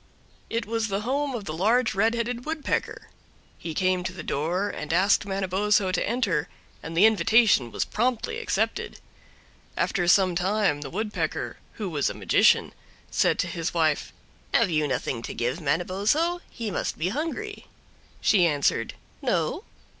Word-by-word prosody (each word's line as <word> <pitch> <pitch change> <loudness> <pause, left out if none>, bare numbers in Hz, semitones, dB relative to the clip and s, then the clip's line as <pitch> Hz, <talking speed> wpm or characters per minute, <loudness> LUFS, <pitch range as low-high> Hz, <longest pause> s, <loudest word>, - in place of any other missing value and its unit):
It 230 +1 -2
was 225 0 -1
the 200 -1 -2
home 275 +3 -1
of 215 -4 -5
the 155 - -4
large 225 +7 +2
Red 220 +3 +2
Headed 235 +1 -2
Woodpecker. 310 0 -3 0.5
He 165 -2 -6
came 185 0 +1
to 185 - -3
the 180 -3 -8
door 170 +9 -1
and 150 - -6
asked 195 +4 +3
Manabozho 195 0 +1
to 185 - 0
enter, 205 -11 0 0.3
and 165 +1 -6
the 195 - +7
invitation 220 - +4
was - - -1
promptly 255 - -1
accepted. 445 - -2 0.8
After 180 -5 0
some 185 0 +5
time 185 -3 +1
the 140 - -6
Woodpecker, 210 +5 -3 0.2
who 210 - -4
was 150 -6 0
a - - -6
magician, - - +3 0.4
said - - +2
to - - 0
his 170 0 -3
wife: 155 -3 +1 0.4
"Have - - +3
you 155 -2 +1
nothing 125 -2 -2
to - - -6
give 125 +8 -2
Manabozho? 200 - +1
he 225 -3 -5
must - - -2
be 165 +4 0
hungry." 330 - -4 0.5
She 185 -5 +4
answered, 140 -6 0 0.3
"No." - - -1
195 Hz, 155 wpm, -26 LUFS, 165-230 Hz, 0.8 s, the